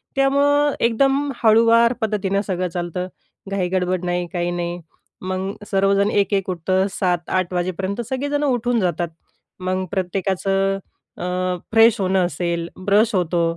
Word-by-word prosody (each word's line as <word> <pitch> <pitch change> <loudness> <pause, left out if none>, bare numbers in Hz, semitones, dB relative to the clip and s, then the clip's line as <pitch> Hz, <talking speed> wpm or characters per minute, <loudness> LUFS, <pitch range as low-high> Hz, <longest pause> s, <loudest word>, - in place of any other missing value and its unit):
त्यामुळं 285 +1 +3
एकदम 270 +5 +2
हळूवार 230 +2 +5
पद्धतीनं 200 -2 0
सगळं 185 -1 -1
चालतं, 175 +1 -4 0.4
घाई-गडबड 185 -1 -1
नाही, 175 0 -1
काही 175 -1 -1
नाही. 175 0 -3 0.4
मग 185 +1 -3 0.2
सर्वजण 195 +1 +3
एक-एक 195 -1 +1
उठतात, 185 +2 0
सात-आठ 180 0 -1
वाजेपर्यंत 185 +4 -2
सगळेजण 285 +3 -1
उठून 245 -3 +1
जातात. 175 -2 -1 0.5
मग 185 0 -1
प्रत्येकाचं 195 +1 0 0.4
अ, - - -6 0.5
फ्रेश 225 0 +5
होणं 185 -1 +2
असेल, 170 -1 -2 0.2
ब्रश 210 +3 +3
होतो 175 -1 +1
190 Hz, 120 wpm, -21 LUFS, 180-225 Hz, 0.5 s, हळूवार